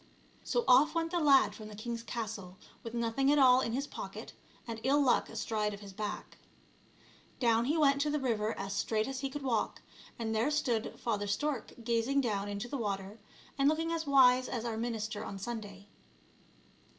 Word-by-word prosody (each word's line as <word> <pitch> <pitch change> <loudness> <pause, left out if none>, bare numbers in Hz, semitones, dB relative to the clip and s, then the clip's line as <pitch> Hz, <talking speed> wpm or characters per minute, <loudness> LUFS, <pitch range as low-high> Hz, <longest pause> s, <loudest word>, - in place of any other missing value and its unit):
So 485 - 0
off 295 +6 +6
went 330 0 0
the 350 - +1
lad 280 -4 +5
from 215 -2 -9
the 210 - -10
king's 230 +2 -5
castle, 215 -6 -6 0.2
with 230 0 -7
nothing 235 +4 +1
at 295 - +4
all 255 -2 +6
in 230 - -2
his 275 +3 -1
pocket - - -8 0.3
and 225 -1 -5
ill 275 +4 +3
luck 265 -4 +3
astride 210 -2 -2
of 200 - -14
his 200 -1 -10
back. 210 +1 -6 1.0
Down 230 -2 +3
he 300 +5 +1
went 280 -2 +4
to 300 - +1
the 300 - 0
river 225 -5 -1
as 195 0 -4
straight 215 +2 0
as 270 -1 -4
he 275 0 -2
could 285 +1 -6
walk, 240 -5 -1 0.3
and 225 -1 -2
there 225 +6 +1
stood 245 -7 -1
Father 210 -4 -1
Stork 270 +2 -2
gazing 235 +4 +1
down 205 -6 -1
into 205 +3 -4
the 280 - -4
water 200 0 -4 0.4
and 275 +1 +5
looking 325 +2 0
as 325 -2 -2
wise 255 -2 +5
as 240 -1 -3
our 230 -2 -2
minister 220 -2 -3
on 200 - -6
Sunday. 200 -2 -7
235 Hz, 190 wpm, -32 LUFS, 215-275 Hz, 1.0 s, off